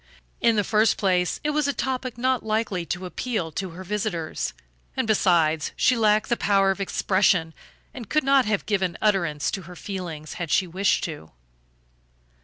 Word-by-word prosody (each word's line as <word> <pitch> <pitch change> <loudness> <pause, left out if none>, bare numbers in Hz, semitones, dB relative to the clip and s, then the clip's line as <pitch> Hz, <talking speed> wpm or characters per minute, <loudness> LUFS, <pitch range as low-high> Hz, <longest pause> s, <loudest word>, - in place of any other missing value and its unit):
In 230 -1 +3
the 210 - +2
first 215 +1 +2
place 180 -3 +1
it 300 - +1
was 300 -1 +1
a 285 - 0
topic 255 -3 -3
not 255 0 +1
likely 215 -5 -1
to 180 +1 -3
appeal 185 -3 -3
to 190 +4 -4
her 175 +3 -9
visitors 190 -4 -3 0.4
and, - - +1
besides, 170 -7 +2
she 255 - +3
lacked 215 -2 +3
the 240 - +3
power 195 -3 +3
of 195 - -4
expression 185 -4 +2 0.4
and 235 -5 -9
could 305 - +2
not 275 -1 +4
have 210 -2 0
given 190 -4 0
utterance 170 -8 +1
to 195 - -4
her 180 - -10
feelings 170 -7 -6
had 170 - -3
she 185 - +3
wished 190 +3 +1
to. 150 - -6
195 Hz, 175 wpm, -24 LUFS, 175-225 Hz, 0.4 s, not